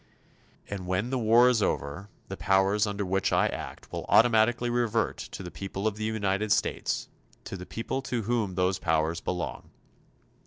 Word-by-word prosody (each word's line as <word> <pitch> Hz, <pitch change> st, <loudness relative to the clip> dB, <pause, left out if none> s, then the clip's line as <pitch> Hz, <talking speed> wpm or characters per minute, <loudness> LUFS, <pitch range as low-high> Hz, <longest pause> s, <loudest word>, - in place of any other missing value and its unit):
And 95 Hz, -3 st, -5 dB
when 95 Hz, +7 st, -1 dB
the 130 Hz, -, 0 dB
war 115 Hz, +2 st, +6 dB
is 125 Hz, -4 st, +3 dB
over, 80 Hz, +4 st, -2 dB, 0.2 s
the 95 Hz, -, -5 dB
powers 95 Hz, +2 st, +2 dB
under 100 Hz, 0 st, -2 dB
which 95 Hz, +1 st, 0 dB
I -, -, +3 dB
act -, -, -6 dB
will -, -, -5 dB
automatically 120 Hz, +1 st, +4 dB
revert 115 Hz, -2 st, +1 dB
to -, -, -7 dB
the 90 Hz, -, -7 dB
people 95 Hz, +1 st, -5 dB
of 110 Hz, -2 st, +1 dB
the 110 Hz, 0 st, -3 dB
United 105 Hz, -1 st, 0 dB
States -, -, 0 dB, 0.4 s
to -, -, -6 dB
the 90 Hz, -1 st, -8 dB
people 130 Hz, +4 st, -3 dB
to 120 Hz, -3 st, -1 dB
whom 110 Hz, -4 st, -1 dB
those 95 Hz, +1 st, +1 dB
powers 80 Hz, 0 st, 0 dB
belong. 90 Hz, -1 st, -4 dB
100 Hz, 170 wpm, -28 LUFS, 95-115 Hz, 0.4 s, war